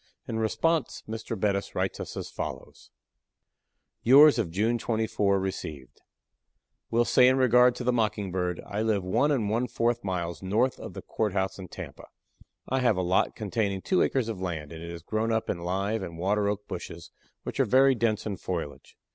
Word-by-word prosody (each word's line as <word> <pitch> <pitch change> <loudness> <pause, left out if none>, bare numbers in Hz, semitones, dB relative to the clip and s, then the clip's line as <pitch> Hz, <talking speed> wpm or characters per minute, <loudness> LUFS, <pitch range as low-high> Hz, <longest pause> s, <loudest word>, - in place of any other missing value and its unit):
In 110 - -2
response 160 +8 0
Mr. 110 0 -5
Bettis 100 -1 -1
writes - - -1
us - - -6
as - - -5
follows: - - -7 1.1
"Yours 140 +2 +7
of 105 -7 0
June 110 +7 0
24 110 -4 +1
received. 80 -8 -6 0.9
Will 120 +1 +2
say 125 - +5
in 130 +1 +4
regard 125 -1 +5
to - - -5
the 125 0 +2
Mockingbird, 95 -6 -1
I 105 +1 -3
live 110 -3 +1
one 115 +11 +2
and 120 -8 +1
one 115 +4 0
fourth 120 0 0
miles 90 -3 -3
north 110 +7 +1
of - - -8
the - - -7
courthouse 95 -3 -1
in 95 - -7
Tampa. - - -9 0.6
I 130 - 0
have 120 -6 +2
a 90 - 0
lot 90 +1 +1
containing 100 -3 -2
two 185 - +2
acres 130 -4 +1
of 110 -5 -5
land, 80 -5 -4
and 80 -1 -8
it 85 - -7
is 85 -1 -8
grown 110 +4 -1
up 110 0 0
in 85 - -4
live 95 +5 -1
and 85 -3 -7
water 100 +4 +1
oak 105 0 -4
bushes - - -7 0.3
which - - -6
are - - +4
very 135 +1 +5
dense 115 -3 0
in 100 -3 -3
foliage. 85 -6 -6
105 Hz, 185 wpm, -27 LUFS, 95-120 Hz, 1.1 s, Yours